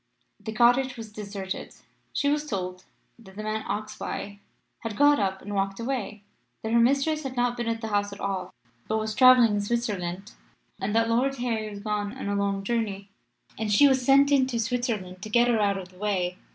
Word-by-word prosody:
The 215 +2 -6
cottage 245 +3 +3
was 220 -2 -8
deserted. 200 -2 -6 0.4
She 285 - 0
was 295 +1 +1
told 185 -5 -4 0.3
that 190 -4 -15
the 215 - -6
man 215 0 -2
Oxbye 205 -1 -5 0.4
had 220 -3 -5
got 290 0 +5
up 190 -1 -1
and 205 - -6
walked 195 0 -1
away; 230 -4 -3 0.4
that 220 - -2
her 235 - +5
mistress 275 +6 +2
had 265 -3 -5
not 245 0 +1
been 240 -1 -3
at 230 0 -1
the 220 - -4
house 205 -1 0
at 200 - -9
all, 190 -2 -3 0.4
but 220 - 0
was 215 0 -2
travelling 255 -2 +7
in 205 0 0
Switzerland; 200 -4 -2 0.5
and 205 +2 -2
that 230 0 +3
Lord 250 +4 +1
Harry 230 -4 -2
was 205 -1 -8
gone 210 +2 -3
on 265 - -5
a 200 - 0
long 200 -1 -1
journey. 200 -3 -2 0.5
And 220 -1 -1
she 285 +8 +7
was 265 -2 +2
sent 275 +2 +5
into 260 -3 +3
Switzerland 230 -6 -2
to 215 - -6
get 240 +2 +4
her 235 -2 +2
out 200 -1 +2
of 185 -1 -7
the 185 0 -19
way. 185 -3 -1
215 Hz, 205 wpm, -26 LUFS, 200-245 Hz, 0.5 s, travelling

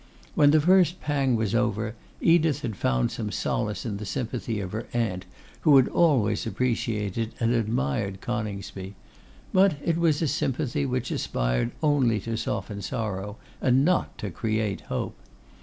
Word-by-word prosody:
When 145 -1 +5
the 155 +2 +5
first 180 +2 +4
pang 140 -4 +1
was 110 -2 -1
over, 115 -2 0 0.3
Edith 165 -3 +3
had 115 -4 -3
found 60 -7 +1
some - - -4
solace 105 +1 -2
in 105 -4 -3
the 105 - -6
sympathy 115 -2 -3
of 95 -2 -4
her 110 +2 -4
aunt, 105 -6 -1 0.3
who 150 -4 +6
had 130 - +5
always 120 -12 +2
appreciated 115 -2 -1
and 115 0 +2
admired 100 - -1
Coningsby; 100 -4 -5 0.6
but 190 -3 +5
it 165 -1 +1
was 160 -3 +3
a - - +2
sympathy 135 +1 -1
which 125 -1 -2
aspired - - 0
only 135 -7 +3
to 115 +2 -3
soften 100 -1 -3
sorrow, 105 0 -4 0.2
and 130 +2 +4
not 180 +1 +1
to 105 - -5
create 110 0 -1
hope. - - -3
115 Hz, 155 wpm, -26 LUFS, 105-140 Hz, 0.6 s, who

